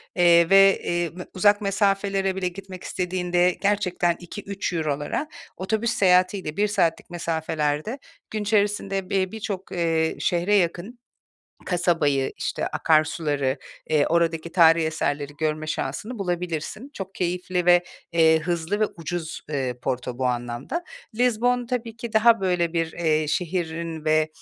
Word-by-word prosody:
Eee, 170 Hz, -2 st, +5 dB
ve, 195 Hz, 0 st, +6 dB
eee, 175 Hz, -2 st, -1 dB, 0.2 s
uzak 205 Hz, +2 st, +4 dB
mesafelere 195 Hz, -1 st, +1 dB
bile 190 Hz, -1 st, -1 dB
gitmek 185 Hz, 0 st, -8 dB
istediğinde 180 Hz, -1 st, 0 dB
gerçekten 190 Hz, -4 st, +1 dB
€2-3'lara 175 Hz, -, -3 dB, 0.3 s
otobüs 220 Hz, +5 st, -1 dB
seyahatiyle 185 Hz, -5 st, +2 dB
1 210 Hz, +1 st, +3 dB
saatlik 190 Hz, -6 st, 0 dB
mesafelerde 160 Hz, -, -2 dB, 0.3 s
gün 215 Hz, -, -2 dB
içerisinde 200 Hz, -2 st, 0 dB
bir 190 Hz, -1 st, 0 dB
birçok, 200 Hz, -3 st, -5 dB
eee, 165 Hz, -2 st, 0 dB
şehre, 175 Hz, +4 st, +1 dB
yakın 190 Hz, +5 st, -1 dB, 0.7 s
kasabayı, 165 Hz, -7 st, +1 dB
işte, -, -, -2 dB
akarsuları, 155 Hz, -3 st, +1 dB, 0.3 s
eee, 150 Hz, -2 st, +3 dB
oradaki 165 Hz, 0 st, 0 dB
tarihî 165 Hz, -2 st, +5 dB
eserleri 145 Hz, -2 st, -2 dB
görme 155 Hz, 0 st, -1 dB
şansını 180 Hz, -, -4 dB
bulabilirsin. 180 Hz, -, -3 dB
Çok 195 Hz, -6 st, -7 dB
keyifli 180 Hz, 0 st, -2 dB
ve, 175 Hz, 0 st, +6 dB, 0.3 s
eee, 160 Hz, -1 st, +5 dB
hızlı 170 Hz, +4 st, -2 dB
ve -, -, +5 dB
ucuz, 165 Hz, 0 st, -5 dB
eee, 135 Hz, -4 st, -2 dB
Porto 125 Hz, -1 st, -3 dB
bu 130 Hz, -, 0 dB
anlamda. 120 Hz, -, -3 dB, 0.3 s
Lizbon 245 Hz, +1 st, +1 dB
tabii 230 Hz, -2 st, -3 dB
ki 230 Hz, 0 st, -7 dB
daha 225 Hz, 0 st, +5 dB
böyle 180 Hz, -3 st, 0 dB
bir, 165 Hz, -1 st, -1 dB
eee, 155 Hz, -2 st, +1 dB
şehrin 165 Hz, -1 st, -2 dB
ve, 155 Hz, 0 st, +3 dB
175 Hz, 130 wpm, -24 LUFS, 160-195 Hz, 0.7 s, ve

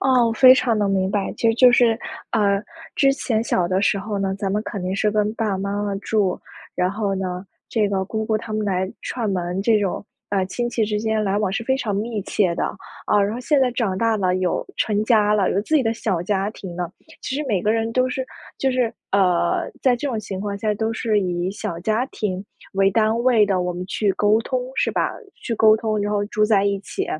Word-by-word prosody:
啊， 255 Hz, -2 st, +4 dB
我 230 Hz, -, 0 dB
非 255 Hz, +3 st, +8 dB
常 240 Hz, -4 st, +1 dB
地 205 Hz, -, +1 dB
明 190 Hz, -1 st, +1 dB
白。 200 Hz, -1 st, -1 dB
其 230 Hz, -, +2 dB
实 225 Hz, -, +3 dB
就 250 Hz, +1 st, +6 dB
是， 235 Hz, -2 st, +4 dB, 0.3 s
呃， 200 Hz, -2 st, +2 dB, 0.3 s
之 275 Hz, -1 st, +4 dB
前 225 Hz, -5 st, -1 dB
小 185 Hz, -6 st, +1 dB
的 185 Hz, +2 st, 0 dB
时 200 Hz, 0 st, +2 dB
候 205 Hz, +1 st, -4 dB
呢， 195 Hz, -1 st, -1 dB
咱 195 Hz, -2 st, -2 dB
们 210 Hz, +1 st, 0 dB
肯 200 Hz, -, -5 dB
定 185 Hz, +1 st, -2 dB
是 210 Hz, +2 st, +1 dB
跟 210 Hz, 0 st, +1 dB
爸 225 Hz, -2 st, -1 dB
爸 190 Hz, -, -1 dB
妈 200 Hz, +1 st, -2 dB
妈 205 Hz, -1 st, -2 dB
住， 200 Hz, -2 st, 0 dB, 0.4 s
然 180 Hz, +1 st, +1 dB
后 205 Hz, -1 st, -1 dB
呢， 185 Hz, -1 st, -4 dB, 0.2 s
这 215 Hz, -3 st, +1 dB
个 195 Hz, -1 st, -1 dB
姑 220 Hz, +3 st, -3 dB
姑 220 Hz, 0 st, +1 dB
他 220 Hz, 0 st, -6 dB
们 215 Hz, 0 st, -1 dB
来 190 Hz, -1 st, -1 dB
串 230 Hz, -4 st, -3 dB
门， 180 Hz, -1 st, -2 dB
这 220 Hz, -1 st, +4 dB
种， 195 Hz, -1 st, -2 dB, 0.2 s
呃， 195 Hz, -2 st, +1 dB
亲 240 Hz, +5 st, -2 dB
戚 230 Hz, -2 st, 0 dB
之 210 Hz, 0 st, -1 dB
间 220 Hz, -1 st, 0 dB
来 200 Hz, 0 st, +1 dB
往 210 Hz, -3 st, 0 dB
是 215 Hz, +5 st, -3 dB
非 265 Hz, +2 st, +1 dB
常 210 Hz, -6 st, -2 dB
密 220 Hz, +1 st, -2 dB
切 185 Hz, -3 st, 0 dB
的。 -, -, -1 dB, 0.4 s
啊， 210 Hz, -, +3 dB
然 200 Hz, +1 st, 0 dB
后 245 Hz, -, -5 dB
现 290 Hz, +3 st, +2 dB
在 260 Hz, -2 st, +3 dB
长 225 Hz, -6 st, -1 dB
大 225 Hz, +2 st, +1 dB
了， 185 Hz, -1 st, +1 dB
有 185 Hz, -2 st, -1 dB
成 210 Hz, -1 st, +1 dB
家 215 Hz, -3 st, +3 dB
了， 205 Hz, -3 st, +2 dB
有 195 Hz, -, +1 dB
自 315 Hz, -, -2 dB
己 295 Hz, -, +5 dB
的 225 Hz, -1 st, 0 dB
小 195 Hz, -7 st, -1 dB
家 195 Hz, +2 st, -1 dB
庭 185 Hz, -5 st, -9 dB
了， 175 Hz, -1 st, -4 dB, 0.3 s
其 260 Hz, -, -3 dB
实 295 Hz, -, -1 dB
每 195 Hz, -6 st, 0 dB
个 210 Hz, -, +2 dB
人 225 Hz, 0 st, 0 dB
都 255 Hz, +2 st, +2 dB
是 260 Hz, -1 st, -2 dB, 0.3 s
就 270 Hz, -, +1 dB
是， 250 Hz, -3 st, 0 dB, 0.2 s
呃， 200 Hz, -, +2 dB
在 255 Hz, -2 st, +3 dB
这 285 Hz, -, -4 dB
种 230 Hz, -5 st, -2 dB
情 195 Hz, -2 st, -6 dB
况 200 Hz, -1 st, -3 dB
下 210 Hz, 0 st, 0 dB
都 220 Hz, +2 st, -1 dB
是 220 Hz, -1 st, 0 dB
以 180 Hz, -1 st, -1 dB
小 195 Hz, -4 st, -5 dB
家 220 Hz, +6 st, 0 dB
庭 195 Hz, -6 st, -4 dB, 0.3 s
为 195 Hz, 0 st, +3 dB
单 220 Hz, +2 st, +2 dB
位 235 Hz, -5 st, +5 dB
的， 185 Hz, -3 st, +1 dB
我 180 Hz, -, -2 dB
们 180 Hz, +1 st, -5 dB
去 200 Hz, 0 st, 0 dB
沟 210 Hz, +2 st, +3 dB
通 255 Hz, +2 st, -1 dB
是 -, -, +1 dB
吧？ -, -, 0 dB, 0.3 s
去 235 Hz, -, -2 dB
沟 215 Hz, 0 st, +6 dB
通， 220 Hz, -1 st, -1 dB
然 205 Hz, +1 st, -1 dB
后 205 Hz, -, +1 dB
住 210 Hz, 0 st, +1 dB
在 210 Hz, -2 st, +3 dB
一 200 Hz, 0 st, +1 dB
起。 200 Hz, -, -4 dB
210 Hz, 265 characters per minute, -22 LUFS, 195-225 Hz, 0.4 s, 非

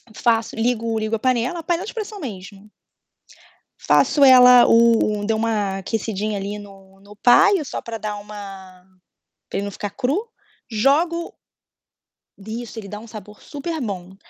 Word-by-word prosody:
faço, 230 Hz, -1 st, 0 dB
ligo 230 Hz, -1 st, -1 dB
ligo 220 Hz, +1 st, -1 dB
a -, -, -4 dB
panela, 255 Hz, +7 st, 0 dB
panela 345 Hz, +3 st, -1 dB
de 435 Hz, -, -8 dB
pressão 430 Hz, -2 st, -6 dB
mesmo. 205 Hz, -, -9 dB, 1.1 s
Faço 290 Hz, -, +3 dB
ela 250 Hz, -2 st, +8 dB
o 230 Hz, -2 st, +3 dB
o -, -, -4 dB
dei 220 Hz, +1 st, 0 dB
uma 215 Hz, -3 st, -1 dB
aquecidinha 210 Hz, +1 st, -3 dB
ali 200 Hz, +1 st, -5 dB
no 195 Hz, -1 st, -15 dB
no 200 Hz, +1 st, -16 dB
paio 370 Hz, -, +4 dB
só 275 Hz, -, -6 dB
para 230 Hz, -1 st, -6 dB
dar 210 Hz, -1 st, -5 dB
uma 195 Hz, -3 st, -11 dB, 0.7 s
para -, -, -3 dB
ele 200 Hz, -, -2 dB
não 200 Hz, -, -5 dB
ficar 205 Hz, +1 st, -5 dB
cru, 270 Hz, -, -1 dB, 0.5 s
jogo 310 Hz, +10 st, +1 dB, 1.0 s
Isso, 225 Hz, +3 st, -7 dB
ele 205 Hz, -, -9 dB
dá 210 Hz, +1 st, -7 dB
um 230 Hz, -, -13 dB
sabor 210 Hz, -1 st, -11 dB
superbom. 245 Hz, -, -6 dB
220 Hz, 150 wpm, -21 LUFS, 205-250 Hz, 1.1 s, ela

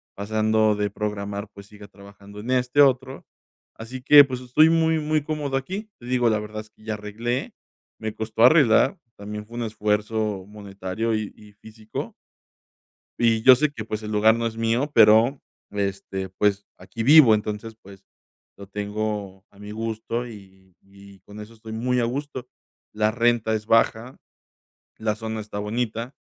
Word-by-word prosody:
pasando 110 Hz, +1 st, +1 dB
de 105 Hz, -1 st, -2 dB
programar, 100 Hz, 0 st, -4 dB
pues, 100 Hz, -1 st, -13 dB
siga 105 Hz, 0 st, -14 dB
trabajando 100 Hz, +1 st, -14 dB
en 120 Hz, +4 st, -5 dB
este 130 Hz, +2 st, +2 dB
otro. 130 Hz, -1 st, +1 dB, 0.5 s
Así 125 Hz, +3 st, -8 dB
que, 145 Hz, +2 st, +8 dB
pues, 130 Hz, -2 st, -6 dB
estoy 140 Hz, +6 st, +4 dB
muy, 160 Hz, -1 st, +2 dB
muy 155 Hz, 0 st, 0 dB
cómodo 150 Hz, -3 st, -3 dB
aquí. 190 Hz, +11 st, -5 dB
Te 120 Hz, -, -14 dB
digo, 125 Hz, -1 st, +1 dB
la 110 Hz, -, +1 dB
verdad 105 Hz, 0 st, -7 dB
es 110 Hz, -, -17 dB
que 110 Hz, -, -24 dB
ya 110 Hz, 0 st, -3 dB
arreglé, 115 Hz, +5 st, -4 dB, 0.5 s
me 110 Hz, -1 st, -4 dB
costó 110 Hz, +1 st, -1 dB
arreglar, 135 Hz, -, +5 dB, 0.2 s
también 105 Hz, +1 st, -7 dB
fue 115 Hz, +2 st, -13 dB
un 120 Hz, -, -2 dB
esfuerzo 105 Hz, -2 st, -2 dB
monetario 100 Hz, +1 st, -4 dB
y 110 Hz, -1 st, -4 dB
y 105 Hz, -1 st, -17 dB
físico 110 Hz, +1 st, -8 dB, 1.0 s
y 115 Hz, -2 st, +2 dB
yo 130 Hz, +2 st, +9 dB
sé 150 Hz, +4 st, +1 dB
que, 110 Hz, -6 st, -7 dB
pues, 110 Hz, -1 st, -5 dB
el 105 Hz, -, -6 dB
lugar 110 Hz, +1 st, +4 dB
no 115 Hz, 0 st, -2 dB
es 115 Hz, 0 st, -4 dB
mío, 115 Hz, +6 st, 0 dB
pero, 115 Hz, +3 st, +5 dB, 0.3 s
este, 100 Hz, -1 st, -4 dB
pues, 100 Hz, +1 st, 0 dB
aquí 95 Hz, +5 st, -7 dB
vivo, 140 Hz, -5 st, +8 dB
entonces, 105 Hz, +1 st, -4 dB
pues, 95 Hz, 0 st, -15 dB, 0.5 s
lo 100 Hz, -, -11 dB
tengo 105 Hz, -1 st, -4 dB
a 100 Hz, -, -22 dB
mi 105 Hz, 0 st, -10 dB
gusto 115 Hz, +2 st, -4 dB
y 95 Hz, -4 st, -15 dB
y 100 Hz, 0 st, -17 dB
con 105 Hz, +1 st, -12 dB
eso 110 Hz, +2 st, -11 dB
estoy 110 Hz, 0 st, -11 dB
muy 125 Hz, +3 st, -1 dB
a -, -, +1 dB
gusto. 130 Hz, +1 st, -4 dB, 0.5 s
La 105 Hz, 0 st, +1 dB
renta 115 Hz, -1 st, +1 dB
es 105 Hz, -1 st, -4 dB
baja, 115 Hz, +2 st, +1 dB, 0.8 s
la 110 Hz, -1 st, -1 dB
zona 110 Hz, +1 st, -5 dB
está 105 Hz, -1 st, -7 dB
bonita 115 Hz, +3 st, -3 dB
110 Hz, 170 wpm, -23 LUFS, 105-120 Hz, 1.0 s, yo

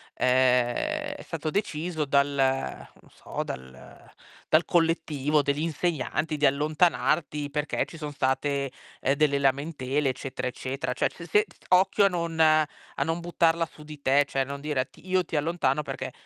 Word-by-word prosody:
ehm, 130 Hz, -, +2 dB
è -, -, -9 dB
stato 155 Hz, -2 st, -4 dB
deciso 165 Hz, -5 st, -2 dB
dal 140 Hz, +1 st, +3 dB
non 135 Hz, -, -2 dB
so, -, -, -5 dB
dal 65 Hz, 0 st, -10 dB, 0.4 s
dal 155 Hz, +2 st, +4 dB
collettivo 155 Hz, -3 st, +1 dB
degli 145 Hz, +2 st, 0 dB
insegnanti 160 Hz, -1 st, -1 dB
di 145 Hz, -, +2 dB
allontanarti 150 Hz, 0 st, +1 dB
perché 150 Hz, 0 st, -1 dB
ci 165 Hz, -, -11 dB
son 150 Hz, -1 st, -5 dB
state, 140 Hz, 0 st, 0 dB, 0.3 s
ehm, 135 Hz, -, +2 dB
delle 145 Hz, -1 st, +2 dB
lamentele 140 Hz, 0 st, 0 dB
eccetera, 130 Hz, 0 st, -4 dB
eccetera". 130 Hz, 0 st, -3 dB
Cioè -, -, +1 dB
s 170 Hz, -, -11 dB
se 210 Hz, +1 st, +4 dB, 0.2 s
occhio 190 Hz, +2 st, +4 dB
a -, -, +5 dB
non 170 Hz, -2 st, -3 dB
a 155 Hz, -1 st, +5 dB, 0.4 s
non 165 Hz, +3 st, -1 dB
buttarla 170 Hz, -1 st, +1 dB
su 150 Hz, -, -14 dB
di 150 Hz, -1 st, -11 dB
te, 140 Hz, +2 st, +4 dB
cioè 135 Hz, 0 st, 0 dB
non 140 Hz, +1 st, -6 dB
dire: 145 Hz, -4 st, -1 dB
"Ti 185 Hz, -, -18 dB
io 185 Hz, -1 st, +2 dB
ti 160 Hz, -, -6 dB
allontano", 150 Hz, -2 st, +1 dB
perché -, -, -5 dB
150 Hz, 160 wpm, -27 LUFS, 135-165 Hz, 0.4 s, a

